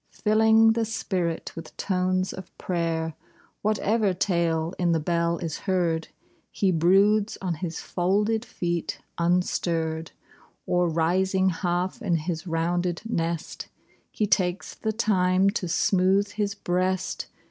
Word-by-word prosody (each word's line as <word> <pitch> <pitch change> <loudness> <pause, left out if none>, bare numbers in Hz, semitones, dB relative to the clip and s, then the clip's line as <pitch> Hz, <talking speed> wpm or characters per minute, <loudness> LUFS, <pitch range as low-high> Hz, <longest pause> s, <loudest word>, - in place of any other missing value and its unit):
Filling 220 +1 +4
the 230 0 0
spirit 180 -6 -2
with 165 - -9
tones 185 0 0
of 185 -1 -11
prayer 165 -2 -1 0.5
Whatever 210 -1 +1
tale 170 -3 0
in 175 -2 +2
the 165 - +2
bell 170 +1 0
is 165 -3 -4
heard, 170 -3 +1 0.5
lie 195 -2 +3
broods 195 +5 +3
on 185 -3 -2
his 165 0 -4
folded 210 +5 0
feet 175 -8 -3 0.2
unstirr'd, 165 -2 0 0.6
Oi, 180 0 +2
rising 185 +3 +2
half 180 +5 -2
in 185 -7 +1
his 165 +1 -3
rounded 175 +2 -1
nest. 165 -6 -3 0.4
He 215 - -1
takes 185 -3 0
the 220 - -2
time 195 -3 +2
to 195 -4 -3
smooth 195 +3 +2
his 205 -1 -2
breast. 185 0 -1
180 Hz, 125 wpm, -26 LUFS, 170-200 Hz, 0.6 s, Filling